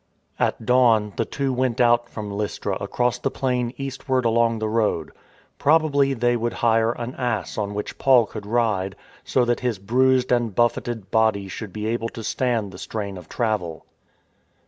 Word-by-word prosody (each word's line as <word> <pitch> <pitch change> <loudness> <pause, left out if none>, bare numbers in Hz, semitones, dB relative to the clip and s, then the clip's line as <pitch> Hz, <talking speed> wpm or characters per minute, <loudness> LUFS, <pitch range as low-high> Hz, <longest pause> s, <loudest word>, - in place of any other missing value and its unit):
At 110 - 0
dawn, 115 -4 +4
the - - 0
two 135 -2 -2
went 125 -1 0
out 120 -1 +3
from 105 -2 -6
Lystra 100 -1 -2
across 120 +4 0
the - - 0
plain 125 -2 -1
eastward 130 -2 -2
along 115 0 +3
the 110 0 -2
road. 105 -8 0 0.5
Probably 145 -2 +3
they 120 0 +2
would 120 0 -1
hire 115 0 +4
an 120 +1 -5
ass 120 -6 -2
on 105 -1 -3
which 105 - -5
Paul 130 -4 +5
could 105 -1 -8
ride, 105 -5 0 0.3
so 125 - +1
that 120 0 +1
his 125 -4 -1
bruised 125 +5 +2
and 120 -5 +1
buffeted 120 -3 0
body 110 -3 +2
should 100 +1 -7
be 105 +2 -5
able 115 +1 -1
to 115 - -5
stand 115 -4 -1
the 90 - -11
strain 100 -3 -4
of 90 -2 -11
travel. 105 - -2
115 Hz, 170 wpm, -23 LUFS, 105-125 Hz, 0.5 s, Paul